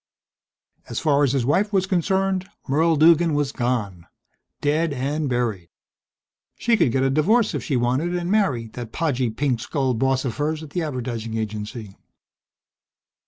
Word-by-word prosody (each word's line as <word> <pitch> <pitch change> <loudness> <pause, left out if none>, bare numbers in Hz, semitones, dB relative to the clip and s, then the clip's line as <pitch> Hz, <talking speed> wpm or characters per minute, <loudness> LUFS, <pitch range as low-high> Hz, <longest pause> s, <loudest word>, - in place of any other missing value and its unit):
As - - -3
far 145 -2 +2
as 135 -2 +2
his 130 -4 0
wife 200 - +2
was 190 -2 +2
concerned 190 +1 0 0.2
Merle 160 +4 +3
Duggan 165 +1 +5
was 145 -2 0
gone. 110 -10 -2 0.5
Dead 155 +2 +1
and 140 +3 -2
buried. 115 -8 -2 0.9
She 235 -1 +2
could 165 - +2
get 130 +2 +1
a 135 - +2
divorce 205 - +3
if - - -3
she 140 -6 0
wanted 130 +9 0
and 175 +1 -2
marry 170 - +1
that 115 0 -8
podgy, 130 -6 0
pink 125 +1 -1
skulled 130 -2 -1
boss 135 +1 +1
of 120 - -3
hers 155 +2 -1
at 150 - -11
the 175 - -2
advertising 120 -6 -4
agency.... 110 -1 -5
140 Hz, 160 wpm, -23 LUFS, 120-165 Hz, 0.9 s, Duggan